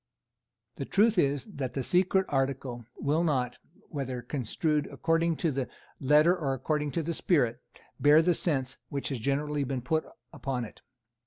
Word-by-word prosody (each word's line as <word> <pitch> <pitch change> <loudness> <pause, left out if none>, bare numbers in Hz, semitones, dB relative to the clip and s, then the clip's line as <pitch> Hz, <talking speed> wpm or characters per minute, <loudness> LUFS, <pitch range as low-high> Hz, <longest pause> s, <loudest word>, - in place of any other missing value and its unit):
The - - -3
truth 210 0 +3
is 140 -3 +1
that 140 - -5
the 135 - -1
secret 185 +5 +3
article 130 -4 -2
will 150 +4 +1
not, 130 -7 0 0.3
whether 130 -4 -4
construed 150 +4 -1
according 165 0 +1
to 165 0 0
the 135 -2 -2 0.3
letter 150 +6 +5
or 140 -7 -1
according 150 +3 -1
to 165 - 0
the 170 +2 -2
spirit, 140 -10 +1 0.4
bear 150 +2 +6
the 175 +1 +3
sense 135 -7 0
which 140 -1 -3
has 135 -4 -3
generally 145 +4 0
been 130 -2 -3
put 160 +5 0 0.3
upon 130 -3 -3
it. 110 - -13
145 Hz, 160 wpm, -29 LUFS, 130-165 Hz, 0.4 s, bear